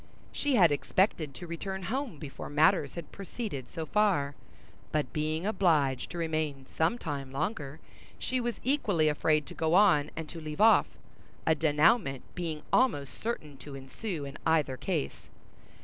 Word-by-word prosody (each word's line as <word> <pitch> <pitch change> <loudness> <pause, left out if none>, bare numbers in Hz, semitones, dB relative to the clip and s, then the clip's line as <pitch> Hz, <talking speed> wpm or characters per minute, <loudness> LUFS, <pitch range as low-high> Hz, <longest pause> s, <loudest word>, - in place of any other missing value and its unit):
She 290 -2 0
had 175 -8 +6
expected 155 -1 +1
to 175 - -7
return 190 +3 -5
home 240 - -3
before 145 -2 -7
matters 145 -2 +3
had 170 - -7
proceeded 195 - -6
so 160 - -5
far, 180 -9 +2 0.6
but 150 -6 -1
being 155 +3 -1
obliged 155 - +2
to 175 - -6
remain 155 -4 -2
some 160 - 0
time 140 - -5
longer, 150 0 -3 0.4
she 255 -1 -1
was 240 -1 -3
equally 205 - +2
afraid 150 0 +2
to - - -9
go 160 +1 +1
on 175 -7 +5
and 160 -1 -5
to 165 - -8
leave 155 -1 -6
off, 220 +1 +6 0.6
a 160 - +4
dénouement 150 - +3
being 160 -4 -4
almost 145 - +2
certain 155 -11 -4
to 140 +1 -9
ensue 145 +4 -5
in 140 +1 -8
either 155 -5 +2
case. 70 - -3
160 Hz, 155 wpm, -30 LUFS, 145-195 Hz, 0.6 s, had